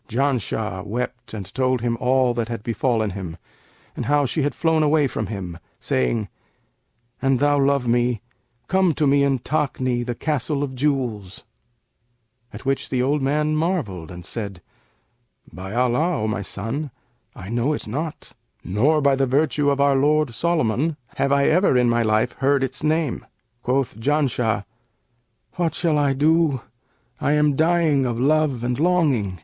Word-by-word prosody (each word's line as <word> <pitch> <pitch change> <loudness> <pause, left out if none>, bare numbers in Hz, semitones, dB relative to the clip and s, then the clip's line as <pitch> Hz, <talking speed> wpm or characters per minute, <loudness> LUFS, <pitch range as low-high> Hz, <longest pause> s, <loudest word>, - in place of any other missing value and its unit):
Janshah 115 -6 -1
wept 120 +3 -5
and 100 -4 -7
told 130 -2 +1
him 120 0 0
all 125 0 +2
that 115 -2 -2
had 115 -3 -5
befallen 115 -1 0
him 90 -3 -6 0.6
and 120 - -4
how 145 0 +3
she 150 +5 -1
had 145 +1 -1
flown 160 -1 +2
away 150 0 +3
from 130 - -3
him, 90 -5 -6 0.2
saying, 85 - 0 0.9
'An 135 -1 +2
thou 145 +2 +2
love 140 -2 +2
me, 120 -1 +1 0.5
come 185 -4 +2
to 150 - +1
me 140 0 +4
in 140 -1 +2
Takni, 130 -3 -1
the 120 0 -4
Castle 145 +1 -1
of 135 -2 -4
Jewels;' 125 -9 -2 1.1
at - - -10
which 135 0 -1
the 125 -1 0
old 145 +2 +1
man 150 +3 +1
marvelled 150 - -2
and 90 -1 -9
said, 100 -6 -6 0.9
'By 95 +4 -7
Allah, 125 +4 +1
O - - 0
my 110 -1 -2
son, 115 +10 -4 0.5
I 95 - -9
know 120 +5 0
it - - -5
not, 150 +8 -5 0.3
nor, 140 - +2
by 140 -1 +4
the 135 0 +1
virtue 145 +2 +2
of 140 0 0
our 140 0 +4
lord 150 -1 +2
Solomon, 155 0 0 0.2
have 140 - +1
I 140 0 +3
ever 175 -5 +3
in 125 -1 +3
my 120 0 +2
life 110 -1 +1
heard 135 0 +2
its 130 0 -2
name!' 155 -3 0 0.4
Quoth 125 -3 -1
Janshah, 125 -6 0 0.9
'What 170 -2 0
shall 160 -4 +1
I 140 -2 +2
do? 150 -1 +2 0.6
I 145 - +1
am 150 -1 +3
dying 160 -4 +2
of 120 -1 -2
love 145 -2 +2
and 125 +1 -1
longing.' 145 - +1
135 Hz, 160 wpm, -22 LUFS, 115-150 Hz, 1.1 s, me